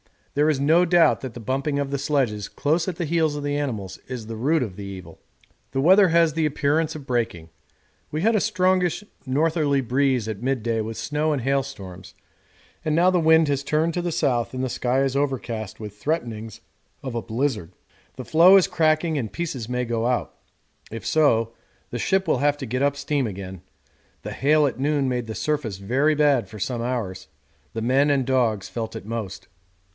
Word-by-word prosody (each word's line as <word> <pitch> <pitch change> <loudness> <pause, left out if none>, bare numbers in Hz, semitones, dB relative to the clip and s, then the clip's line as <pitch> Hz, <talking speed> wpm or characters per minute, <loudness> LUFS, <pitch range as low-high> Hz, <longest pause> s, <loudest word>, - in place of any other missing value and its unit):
There 150 +2 +3
is 140 -3 0
no 160 +5 +4
doubt 175 -1 +4
that 130 -3 -6
the 120 - -7
bumping 135 +5 -1
of 140 -1 -2
the 140 - -1
sledges 130 -8 0
close 160 +5 0
at 185 - -2
the 170 - -3
heels 160 -1 +1
of 145 - -4
the 145 0 -1
animals 110 -10 -4
is 125 -4 -6
the 110 0 -6
root 145 +5 +2
of 95 -6 -7
the 100 - -6
evil. 95 -4 -9 0.5
The 135 - +1
weather 190 +6 +6
has 165 -2 +3
the 160 -1 0
appearance 150 +2 0
of 150 -3 -8
breaking. 115 -10 -2 0.6
We 155 - -3
had 225 +5 +3
a - - +4
strongish 185 -2 +1 0.2
northerly 150 0 +1
breeze 130 -2 +1
at 105 -1 -5
midday 120 -3 -1
with 110 +1 -5
snow 150 +1 -1
and 140 - -2
hail 135 +2 +1
storms, 95 -9 -10 0.7
and 155 -1 0
now 180 +3 +4
the 180 - +2
wind 160 -1 +5
has 140 -1 0
turned 155 +3 0
to 175 - -1
the 175 0 -2
south 125 -8 0
and 130 - -2
the 130 - -1
sky 125 +2 0
is 135 0 0
overcast 120 -7 -3
with 105 -2 -8
threatenings 115 -5 -3 0.4
of 130 -3 -4
a 115 - -2
blizzard. 110 - -2 0.4
The 130 - -7
floe 175 +4 +7
is 195 - +5
cracking 155 -1 +1
and 115 -5 -4
pieces 140 -9 -4
may 125 0 -1
go 115 0 -1
out 125 -1 -1 0.6
if 115 0 -7
so 115 -7 +2 0.4
the 120 - -3
ship 190 - +1
will - - +2
have 145 0 +2
to 135 - -4
get 130 +2 -2
up 140 0 +2
steam 140 -2 -1
again. 95 -3 -7 0.6
The - - -5
hail 150 +3 +3
at 135 - -2
noon 140 -1 +1
made 125 -2 -2
the 110 - -5
surface 145 -10 -2
very 130 +10 +1
bad 145 -5 +3
for 110 - -11
some 120 +4 -3
hours; 110 -7 -3 0.5
the 115 - -3
men 135 +4 +3
and 140 -3 +2
dogs 120 -6 +1
felt 115 -2 -5
it - - -7
most. 105 -4 -5
135 Hz, 200 wpm, -23 LUFS, 115-155 Hz, 0.7 s, floe